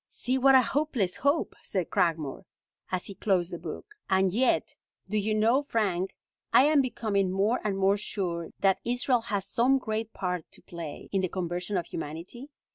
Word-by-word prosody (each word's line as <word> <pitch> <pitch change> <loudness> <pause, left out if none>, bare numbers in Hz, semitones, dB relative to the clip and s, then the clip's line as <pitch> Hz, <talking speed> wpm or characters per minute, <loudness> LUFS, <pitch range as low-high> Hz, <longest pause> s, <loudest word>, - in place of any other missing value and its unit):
"See 255 +2 -1
what 270 +1 +6
a 260 - +7
hopeless 245 -10 0
hope," 285 +7 +1
said 185 -4 -3
Cragmore, 165 -4 0 0.5
as 185 -1 -1
he 200 - -7
closed 185 -3 0
the 170 - -4
book. 165 - -8 0.2
"And 190 -1 +3
yet 250 +4 +2 0.3
do 210 - -4
you 215 +1 +1
know, 230 +6 +3
Frank, 195 -9 -1 0.4
I - - +7
am 295 0 +5
becoming 210 -7 0
more 200 +6 +1
and 200 -2 -1
more 195 +1 +3
sure 175 -5 -3
that 195 -1 +3
Israel 245 0 +1
has 205 -4 -2
some 255 +3 +3
great 220 -3 -3
part 180 -5 -3
to - - -12
play 165 -4 -8
in 195 - +1
the 185 - -1
conversion 180 +2 -2
of 175 - -1
humanity? 170 - -7
200 Hz, 180 wpm, -28 LUFS, 180-240 Hz, 0.5 s, a